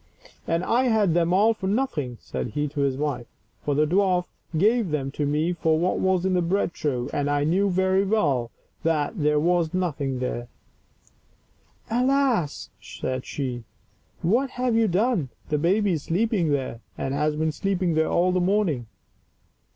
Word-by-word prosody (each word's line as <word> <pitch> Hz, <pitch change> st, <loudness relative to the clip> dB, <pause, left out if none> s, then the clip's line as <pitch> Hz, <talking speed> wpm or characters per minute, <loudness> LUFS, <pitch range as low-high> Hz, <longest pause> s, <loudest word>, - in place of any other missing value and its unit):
"And 165 Hz, +2 st, 0 dB
I 245 Hz, +6 st, +2 dB
had 215 Hz, -7 st, +3 dB
them 170 Hz, 0 st, +2 dB
all 210 Hz, +5 st, +4 dB
for 190 Hz, -3 st, -5 dB
nothing," 175 Hz, -, -1 dB
said -, -, -4 dB
he 150 Hz, 0 st, 0 dB
to 145 Hz, -, -6 dB
his 135 Hz, -2 st, +1 dB
wife; 145 Hz, -5 st, -2 dB, 0.4 s
"for 145 Hz, -, 0 dB
the 150 Hz, +2 st, +3 dB
dwarf 180 Hz, +1 st, +2 dB, 0.3 s
gave 215 Hz, +3 st, +3 dB
them 140 Hz, -3 st, -2 dB
to 145 Hz, +1 st, -2 dB
me 155 Hz, +4 st, +1 dB
for 160 Hz, -2 st, +1 dB
what 175 Hz, +3 st, 0 dB
was 190 Hz, -1 st, +1 dB
in 190 Hz, -, +1 dB
the 180 Hz, -, +2 dB
bread 175 Hz, +1 st, 0 dB
trough, 130 Hz, -6 st, -2 dB
and 145 Hz, 0 st, 0 dB
I 145 Hz, 0 st, +1 dB
knew 190 Hz, +6 st, +2 dB
very 190 Hz, +1 st, +2 dB
well 145 Hz, -, +1 dB, 0.3 s
that 160 Hz, +3 st, 0 dB
there 150 Hz, 0 st, +3 dB
was 170 Hz, +1 st, +1 dB
nothing 145 Hz, -7 st, -1 dB
there." 125 Hz, -1 st, -3 dB, 0.7 s
" -, -, -30 dB
Alas," 250 Hz, -, +1 dB
said 130 Hz, 0 st, -5 dB
she, 125 Hz, -4 st, -4 dB, 0.3 s
" -, -, -37 dB
what 265 Hz, +3 st, +2 dB
have 250 Hz, -2 st, -1 dB
you 225 Hz, -1 st, +3 dB
done! 195 Hz, -, +1 dB, 0.2 s
the 150 Hz, -, +1 dB
baby 195 Hz, +5 st, +2 dB
is 160 Hz, -4 st, -1 dB
sleeping 190 Hz, -1 st, +1 dB
there, 135 Hz, -5 st, -1 dB, 0.2 s
and 135 Hz, -, -2 dB
has 150 Hz, +1 st, 0 dB
been 155 Hz, +1 st, 0 dB
sleeping 185 Hz, 0 st, -1 dB
there 160 Hz, 0 st, +2 dB
all 180 Hz, +1 st, +2 dB
the 180 Hz, 0 st, +1 dB
morning." 175 Hz, -, +1 dB
170 Hz, 175 wpm, -25 LUFS, 145-195 Hz, 0.7 s, all